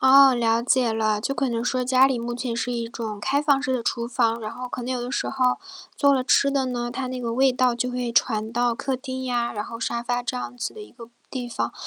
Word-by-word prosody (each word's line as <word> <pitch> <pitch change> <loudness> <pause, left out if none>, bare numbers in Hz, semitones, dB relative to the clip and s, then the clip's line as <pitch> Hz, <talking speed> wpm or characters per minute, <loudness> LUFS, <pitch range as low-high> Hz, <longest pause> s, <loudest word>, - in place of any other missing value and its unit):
哦， 270 0 +7
了 230 -1 +2
解 245 -2 +2
了。 215 -1 +1
就 275 - -2
可 275 -1 0
能 230 0 -2
说 255 0 0
家 255 +1 +5
里 265 -3 +1
目 240 +1 -4
前 245 -1 -3
是 245 +1 -2
一 235 -1 -2
种 220 -3 -5
开 275 +7 +1
放 285 -2 +3
式 265 -2 -1
的 245 - 0
厨 235 0 -2
房， 235 -1 +1
然 215 -1 -5
后 250 0 -7
可 250 - -5
能 255 +2 -2
有 250 - -2
的 245 +1 -4
时 - - -1
候 255 -2 +1 0.4
做 280 -1 +4
了 260 -2 +1
吃 280 +1 +4
的 275 -1 +1
呢， 240 -1 -3
它 260 +1 -3
那 255 0 -4
个 235 -2 -3
味 265 +2 +4
道 250 -1 +2
就 245 +1 -2
会 245 -1 -2
传 220 -1 +1
到 240 0 +1
客 265 +2 -2
厅 260 0 -6
呀， 240 -2 -1
然 210 -1 -4
后 230 - -8
沙 235 +1 -2
发 245 0 -1
这 250 +1 -3
样 245 - -6
子 245 - -3
的 435 - -8
一 415 - -12
个 235 -2 -12 0.2
地 250 -2 -4
方。 - - -2
245 Hz, 295 characters per minute, -24 LUFS, 235-260 Hz, 0.4 s, 哦